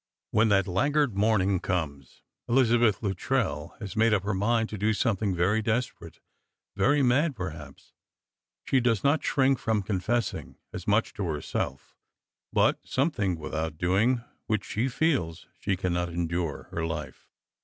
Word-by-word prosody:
When 110 +1 +3
that 100 -2 +3
laggard 140 +6 +1
morning 100 -2 +2
comes, 70 -9 -4 0.3
Elizabeth 120 -3 +3
Luttrell 90 -4 -1
hag 100 -5 -7
made 115 0 +4
up 95 - -1
her 105 +1 -1
mind 115 +4 +1
to 105 - -5
do 110 +2 +2
something 105 -4 0
very 95 +6 +2
desperate, 115 +3 -3 0.6
very 145 +2 +3
mad, 135 +4 +2
perhaps; 75 - -8 0.7
she 135 - +3
does 115 -4 +1
not 145 +3 +2
shrink 135 -2 +2
from 110 -3 0
confessing 105 +5 -2 0.2
as - - -7
much - - +2
to 100 - -3
her 75 -2 -2
self; 65 -1 -4 0.6
but - - +3
something 105 - 0
without 80 0 -4
doing 110 +9 +2 0.2
which 110 -2 -2
s»o 120 +5 +1
feels 125 - 0
she 95 -2 -1
cannot 90 -1 -1
endure 85 -2 -2
her 85 - -3
life. 80 -2 -5
100 Hz, 145 wpm, -27 LUFS, 85-120 Hz, 0.7 s, made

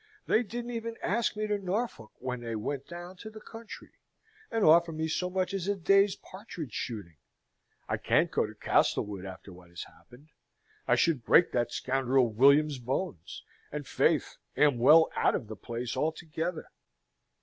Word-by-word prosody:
They 220 - +3
didn't 240 +2 -5
even 230 -1 -4
ask 225 +4 0
me 215 - -1
to 210 -1 -1
Norfolk 190 - -3
when 125 -1 -5
they 115 -1 -4
went 135 +6 -4
down 175 +2 -9
to 220 - -9
the 220 0 -11
country, 225 +1 -11 0.6
and 225 -2 +1
offer 170 +2 +6
me 160 0 -2
so 180 +3 -1
much 185 0 -1
as 195 -2 -3
a 205 - +1
day's 195 +2 +3
partridge 185 - -9
shooting. 100 - -5 0.7
I - - -1
can't - - +2
go - - +1
to - - -12
Castlewood 100 -2 0
after 95 0 -10
what 90 0 -16
has 85 0 -7
happened; 135 +5 -18 0.6
I - - +4
should 150 -8 +1
break 175 - +5
that 120 -1 0
scoundrel 130 -2 +1
William's 140 +4 +4
bones; 125 - -4 0.3
and, 150 0 -5
faith, - - +1 0.2
am 145 -5 +4
well 160 +6 +6
out - - +2
of 110 - -4
the 110 - -7
place 120 +3 -5
altogether." 160 +1 -3
155 Hz, 170 wpm, -29 LUFS, 120-190 Hz, 0.7 s, offer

